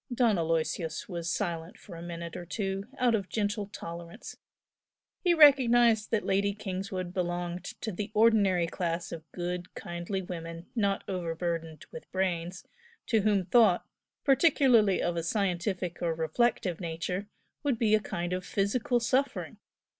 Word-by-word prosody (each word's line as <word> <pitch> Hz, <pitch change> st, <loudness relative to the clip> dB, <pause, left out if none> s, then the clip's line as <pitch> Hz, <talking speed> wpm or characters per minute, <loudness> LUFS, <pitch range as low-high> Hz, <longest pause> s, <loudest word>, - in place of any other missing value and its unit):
Don 240 Hz, -3 st, +3 dB
Aloysius 165 Hz, 0 st, -1 dB
was 170 Hz, -2 st, -4 dB
silent 170 Hz, -3 st, -3 dB
for 180 Hz, -, -12 dB
a 165 Hz, -, -8 dB
minute 170 Hz, -1 st, -6 dB
or -, -, -5 dB
two, 195 Hz, +1 st, -3 dB
out 245 Hz, -2 st, +3 dB
of 200 Hz, -4 st, -1 dB
gentle 205 Hz, -1 st, -1 dB
tolerance. 170 Hz, 0 st, -8 dB, 0.9 s
He 350 Hz, -2 st, +4 dB
recognised 240 Hz, -7 st, +6 dB
that 225 Hz, -2 st, 0 dB
Lady 200 Hz, +1 st, +1 dB
Kingswood 185 Hz, -2 st, -4 dB
belonged 175 Hz, -1 st, -2 dB, 0.2 s
to 220 Hz, -, -2 dB
the 200 Hz, +2 st, -4 dB
ordinary 205 Hz, -5 st, +4 dB
class 170 Hz, 0 st, -3 dB
of 160 Hz, -1 st, -9 dB
good, 180 Hz, 0 st, -4 dB
kindly 175 Hz, +3 st, -4 dB
women 165 Hz, -1 st, -7 dB
not 200 Hz, -4 st, +1 dB
overburdened 165 Hz, -3 st, -3 dB
with 160 Hz, -, -10 dB
brains, 185 Hz, -1 st, -2 dB, 0.4 s
to 225 Hz, -3 st, +2 dB
whom 200 Hz, -3 st, +2 dB
thought, 220 Hz, -4 st, +4 dB, 0.4 s
particularly 265 Hz, -, +4 dB
of 175 Hz, -, 0 dB
a -, -, +1 dB
scientific 180 Hz, -1 st, -1 dB
or 170 Hz, -2 st, 0 dB
reflective 175 Hz, +2 st, 0 dB
nature, 180 Hz, +4 st, -3 dB, 0.3 s
would 280 Hz, -5 st, 0 dB
be 220 Hz, -2 st, +2 dB
a 215 Hz, -, +6 dB
kind 175 Hz, -3 st, -3 dB
of 185 Hz, 0 st, -2 dB
physical 220 Hz, +6 st, 0 dB
suffering. 260 Hz, +4 st, 0 dB
185 Hz, 145 wpm, -29 LUFS, 170-215 Hz, 0.9 s, recognised